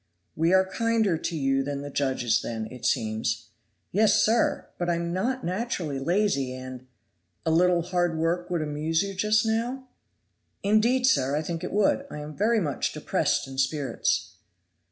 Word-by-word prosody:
"We 165 +2 +2
are 190 0 +5
kinder 220 -1 +1
to 165 +1 -3
you 135 -1 +1
than 140 0 -4
the 145 - -7
judges 125 -5 +1
then, 110 -1 -4
it 125 -1 -3
seems." 110 -1 -1 0.4
"Yes, 210 +3 +4
sir! 230 +2 +2
but 175 0 -1
I 170 - +2
am 170 0 -2
not 255 +8 -1
naturally 180 - -2
lazy, 150 -5 0
and 130 0 -9 0.3
" 85 0 -45
"A 160 - +2
little 175 +1 +3
hard 175 -2 0
work 170 +2 -1
would 170 -3 0
amuse 155 +3 0
you 200 0 -4
just 215 +3 +2
now?" 240 +4 -1 0.8
"Indeed, 225 +5 +3
sir, 140 - +3
I 155 - -1
think 165 +1 -4
it 180 - -4
would; 210 +7 +2
I - - -7
am 150 0 -7
very 220 +3 +2
much 145 -9 -1
depressed - - 0
in 135 0 -6
spirits." 135 +1 -1
170 Hz, 175 wpm, -26 LUFS, 135-205 Hz, 0.8 s, are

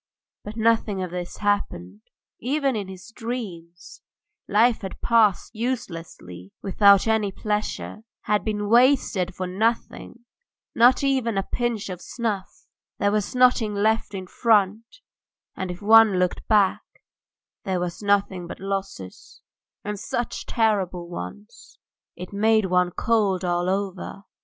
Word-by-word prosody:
But 210 +2 -8
nothing 220 -4 +1
of 180 - -5
this 180 0 -6
had 205 - -5
happened, 100 - -4 0.4
even 275 +1 0
in 205 -3 -3
his 190 +4 -11
dreams; 200 -9 -7 0.5
life 225 +3 +3
had 190 - -7
passed 225 -5 +2
uselessly 165 - -5
without 200 0 +5
any 220 -3 +1
pleasure, 210 +1 -3 0.2
had 210 0 0
been 210 -1 -2
wasted 230 -6 +3
for 185 - -3
nothing, 230 +4 -2 0.5
not 250 +4 +5
even 260 -6 +1
a 195 - +1
pinch 235 -1 -2
of 180 -1 -6
snuff; 215 -5 -4 0.3
there 200 - +1
was 210 +3 -1
nothing 250 -4 +3
left 215 0 0
in 190 -1 -5
front, 220 - +1 0.5
and 190 - -4
if 180 +3 -7
one 220 -2 +6
looked 180 0 -1
back 205 -3 +3 0.8
there 185 -2 -1
was 175 +1 -4
nothing 195 -3 0
there - - -8
but - - -24
losses, 195 - -6 0.4
and 210 -1 -4
such 240 +4 -4
terrible 190 -6 0
ones, 100 - -9 0.4
it 180 +3 -9
made 220 +1 +3
one 180 -1 +2
cold 195 -2 0
all 175 0 0
over. 195 0 -3
205 Hz, 135 wpm, -24 LUFS, 185-225 Hz, 0.8 s, one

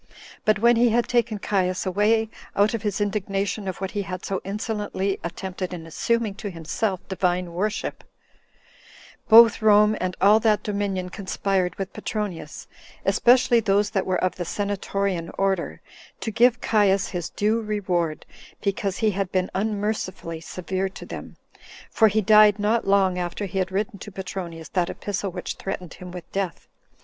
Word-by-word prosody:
But 215 -2 +4
when 235 +2 +4
he 240 +1 +5
had 235 +1 +2
taken 235 -3 +1
Caius 185 -2 0
away, 210 +4 +2 0.3
out 205 +3 +3
of 230 - -2
his 210 -2 -2
indignation 200 0 -1
of 185 - -4
what 190 -1 -3
he 205 - -2
had 185 -2 -6
so 195 -1 -2
insolently 205 -1 -2
attempted 185 +1 -4
in 165 -2 -8
assuming 220 +7 0
to 205 - -3
himself 185 +3 -3
divine 180 -2 -1
worship, 210 +4 -2 1.3
both 230 +1 +8
Rome 210 0 +5
and 185 0 -2
all 205 +3 +6
that 215 -2 +2
dominion 200 -3 -2
conspired 190 -2 -1
with 195 -1 -5
Petronius, 195 -8 -5 0.4
especially 240 +4 +4
those 205 -1 +2
that 195 -4 -1
were 185 -1 +1
of 185 - 0
the 180 - -2
senatorian 195 -2 -2
order, 195 -2 -1 0.4
to 220 - -2
give 240 +2 +4
Caius 200 -3 +2
his 175 -2 -4
due 215 +3 0
reward, 180 -7 -1 0.3
because 200 -1 -1
he 220 -2 +2
had 195 -1 -2
been 185 -1 0
unmercifully 200 -5 -2
severe 185 +3 -3
to - - -10
them; - - -8 0.5
for 220 - +5
he 215 +1 +2
died 210 0 +6
not 215 +2 +1
long 190 -2 +3
after 175 +3 -3
he 190 0 -3
had 185 0 -1
written 200 +1 -2
to 210 - -9
Petronius 185 -4 -6
that 180 -2 0
epistle 200 -1 -3
which - - -5
threatened 180 -3 -5
him 180 - -10
with 175 -2 -8
death. 195 -3 -3
195 Hz, 160 wpm, -24 LUFS, 185-210 Hz, 1.3 s, both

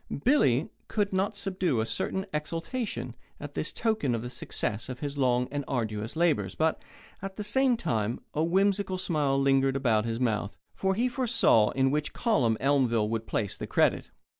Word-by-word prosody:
Billy 155 - +3 0.2
could 205 -3 -1
not 195 +2 0
subdue 185 - 0
a 110 - +1
certain 190 +11 -2
exultation 165 - -3 0.3
at 145 0 -8
this 155 - -2
token 220 - 0
of 115 - -4
the 125 - -6
success 110 -2 -3
of 130 - -5
his 145 0 -4
long 125 -2 +2
and 145 0 -2
arduous 110 -3 -3
labours, 155 - +1
but, 160 0 +1 0.4
at 195 0 -6
the 210 - -4
same 250 +3 +3
time, 115 - -1
a 155 - +1
whimsical 190 +2 +1
smile 150 -7 0
lingered 135 0 +3
around 115 -5 +2
his 115 0 -2
mouth, 110 -4 -1 0.2
for 190 0 0
he 240 +5 +2
foresaw 240 - +3
in 135 0 +2
which 150 0 -1
column 125 - +1
Elmville 125 -6 +2
would 115 0 -3
place 100 -3 -1
the - - -5
credit. - - +2
145 Hz, 175 wpm, -28 LUFS, 120-190 Hz, 0.4 s, Billy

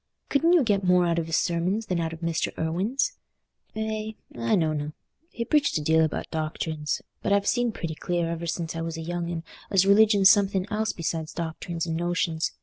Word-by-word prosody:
Couldn't 330 +5 +3
you 340 -5 +5
get 205 -4 +1
more 180 -1 +4
out 170 0 +1
of 165 - -3
his 160 - +1
sermons 180 +6 0
than 180 -4 -1
out 165 -1 -1
of 165 0 -9
Mr. 165 -1 -1
Irwine's?" 195 - 0 0.6
"Eh, 220 0 -3 0.2
I 115 -1 +1
knowna. 155 -4 0 0.4
He 235 - -4
preached 290 - +2
a - - -2
deal 160 +1 +4
about 155 - -2
doctrines. 155 -1 -2 0.2
But - - -1
I've 200 0 +3
seen 245 +1 +2
pretty 165 -6 -4
clear, 175 +1 -1
ever 170 0 -4
since 165 0 -3
I 165 - -3
was 165 0 -4
a - - -5
young 170 +1 -3
un, 165 -1 -4 0.3
as 195 -1 +4
religion's 200 -1 +6
something 195 -2 +2
else 220 +1 0
besides 160 -1 -3
doctrines 170 0 -4
and 165 -2 -2
notions. 170 -1 0
170 Hz, 200 wpm, -26 LUFS, 160-205 Hz, 0.6 s, religion's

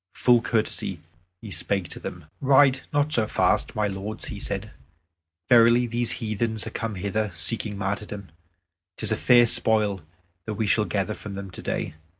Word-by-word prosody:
Full 120 -2 +4
courteously 115 -2 -1 0.4
he 105 - -8
spake 90 +2 -1
to - - -6
them: 85 -3 -8 0.2
"Ride 135 0 +5
not 145 0 +1
so 110 -2 +2
fast, - - +1
my 105 - +1
lords," 100 +2 -6
he 105 - -6
said; 100 +2 -4 0.8
"verily 120 +1 +6
these 120 0 -1
heathen 110 0 -2
are - - -6
come 115 -2 -4
hither, 100 +2 -2
seeking 105 +4 +2
martyrdom. 100 0 -4 0.7
'Tis - - -2
a - - +3
fair 120 -1 +5
spoil 105 -4 +1 0.4
that 110 - -4
we 110 +1 -1
shall 105 +1 +2
gather 100 +3 -1
from 100 -1 -8
them 100 -1 -7
today. - - -4
110 Hz, 160 wpm, -25 LUFS, 100-115 Hz, 0.8 s, verily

